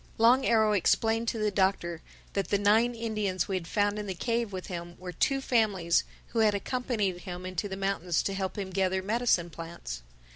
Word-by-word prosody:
Long 245 +4 +5
Arrow 220 -2 +4
explained 225 +3 +2
to 230 - 0
the 215 -1 +1
Doctor 190 -4 0 0.3
that 195 - -1
the 200 - +2
nine 220 +4 +3
Indians 215 -5 -1
we 195 - -1
had 175 -3 -3
found 205 +2 +1
in 210 - -5
the 190 - -3
cave 230 +2 -1
with 185 -1 -5
him 175 -1 -6
were 180 0 -7
two 270 - +1
families 205 -10 +2 0.2
who 230 - -1
had 215 -2 +4
accompanied 210 -5 -1
him 180 0 -7
into 185 +2 -3
the 190 - -5
mountains 195 -4 0
to 195 - -1
help 190 0 -3
him 195 -2 -4
gather 190 0 0
medicine 210 -5 +1
plants. 165 - -7
200 Hz, 195 wpm, -29 LUFS, 185-225 Hz, 0.3 s, Long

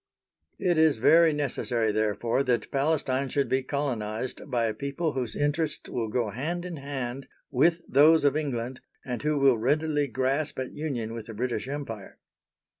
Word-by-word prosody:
It 175 -4 +1
is 160 -5 +4
very 165 +8 +6
necessary, 125 -6 0
therefore, 110 +3 0
that 125 -2 0
Palestine 140 -2 0
should 140 +2 0
be 130 0 +1
colonised 130 -3 -3
by 120 -3 +1
a 110 - 0
people 140 +4 -2
whose 125 -4 -3
interests 145 +2 -1
will 115 -2 -2
go 110 -1 -1
hand 165 - -3
in 175 -3 -5
hand 135 -2 -5 0.2
with 165 +6 +3
those 155 +4 +6
of 145 0 +3
England 130 -5 -3 0.2
and 125 -2 -4
who 150 0 +1
will 135 -4 +4
readily 150 +4 +1
grasp 135 +5 -1
at 130 -1 -4
union 125 -7 -3
with 115 -2 -7
the 110 - -8
British 125 +2 -2
Empire. 135 -8 -6
135 Hz, 165 wpm, -27 LUFS, 120-150 Hz, 0.2 s, very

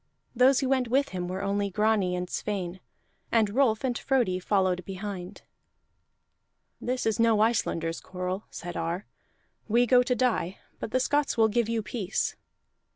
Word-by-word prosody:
Those 255 +3 +5
who 265 - 0
went 260 -2 +2
with 275 +4 +2
him 180 -1 -4
were 185 +2 -4
only 200 0 0
Grani 205 -2 +1
and 180 0 -3
Sweyn, 190 -2 -3 0.5
and 220 -3 +3
Rolf 230 -2 +2
and 250 -2 0
Frodi 240 -11 +1
followed 185 -1 +1
behind. 190 -1 -6 1.4
"This 250 +1 -2
is 220 -1 +1
no 230 -2 +4
Icelanders 165 -7 +1
quarrel," 185 +2 -4
said 175 0 -7
Ar. 170 +4 -2 0.6
"We 235 +3 +4
go 250 +1 +5
to 250 0 0
die, 230 -8 0 0.2
but - - -4
the 255 - +1
Scots 290 0 +1
will 220 -1 +5
give 230 +1 +1
you 230 -1 0
peace." 200 -1 -2
210 Hz, 160 wpm, -28 LUFS, 185-245 Hz, 1.4 s, Those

